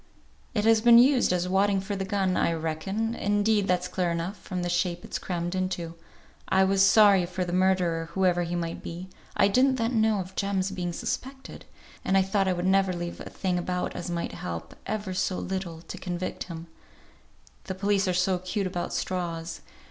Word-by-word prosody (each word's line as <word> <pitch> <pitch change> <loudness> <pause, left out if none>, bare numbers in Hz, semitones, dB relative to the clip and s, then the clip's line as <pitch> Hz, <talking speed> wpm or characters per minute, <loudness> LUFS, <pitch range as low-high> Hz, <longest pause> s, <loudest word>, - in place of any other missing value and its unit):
"It 210 -1 +1
has 225 -1 +5
been 235 0 +8
used 255 -1 +5
as 180 0 0
wadding 195 +1 +2
for 195 +2 -4
the 195 - -2
gun, 190 -1 0
I 170 - +2
reckon; 165 +8 -2
indeed, 205 -1 +1
that's 180 0 +1
clear 180 -2 -1
enough, 170 +4 -2
from 180 -2 -4
the - - -1
shape 175 0 -1
it's - - -4
crammed 175 -1 -3
into. 185 -3 -2 0.6
I 190 - +4
was 195 0 +2
sorry 195 -2 +6
for 185 +1 -3
the 175 - -4
murderer, 180 -3 +1
whoever 180 -2 +2
he 175 0 -2
might 170 -1 -3
be 175 +3 -7 0.3
(I - - +5
didn't 260 +6 +3
then 230 -1 +1
know 220 -2 +2
of 190 0 -7
Jem's 195 -1 -1
being 180 -2 -3
suspected), 265 +9 -5 0.4
and 195 - +2
I 190 - +5
thought 195 0 +1
I 185 - +2
would 175 0 -3
never 195 0 +3
leave 175 0 -5
a - - -7
thing 180 -2 -1
about 180 +1 -2
as - - -5
might 170 -1 -2
help, 85 -1 -6
if - - -24
ever 210 -3 -3
so 185 0 -1
little, 180 -3 -4
to - - -8
convict 180 0 -4
him; 165 -2 -8 1.0
the 190 - -4
police 200 0 +1
are - - +2
so 180 0 +1
'cute 185 +3 -2
about 180 -1 -3
straws. 170 -2 -3
185 Hz, 200 wpm, -27 LUFS, 175-200 Hz, 1.0 s, been